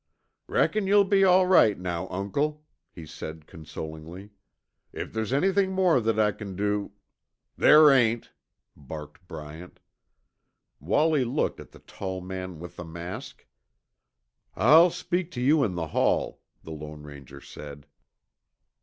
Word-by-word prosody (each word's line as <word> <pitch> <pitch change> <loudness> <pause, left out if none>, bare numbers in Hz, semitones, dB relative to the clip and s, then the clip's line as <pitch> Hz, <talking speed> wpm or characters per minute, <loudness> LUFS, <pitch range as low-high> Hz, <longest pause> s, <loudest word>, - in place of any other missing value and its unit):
"Reckon 210 -2 +1
you'll 200 +1 +5
be 195 0 +3
all 185 0 +5
right 165 - +5
now, 90 0 -4
Uncle," 145 +11 -3 0.3
he 85 - -11
said 80 0 -9
consolingly. 80 +5 -9 0.6
"If - - -7
there's 110 0 -3
anything 190 +6 +1
more 180 -8 +3
that 110 -1 0
I 105 -1 +3
c'n 100 -2 -8
do 105 +1 -2 0.3
" - - -57
"There 150 -1 +8
ain't," 120 -3 +2 0.4
barked 75 +4 -10
Bryant. 80 +2 -10 1.0
Wallie 155 -3 +2
looked 125 +5 -2
at - - -11
the - - -15
tall 95 -1 -7
man 95 -1 -7
with 90 +1 -10
the 85 - -6
mask. 85 +2 -8 1.1
"I'll 155 - +6
speak 175 0 -3
to - - -5
you 140 +4 +3
in 95 -7 -1
the 80 -2 -4
hall," - - 0 0.2
the 80 - -10
Lone 75 -1 -9
Ranger 70 -2 -12
said. 70 0 -11
100 Hz, 135 wpm, -26 LUFS, -, 1.1 s, There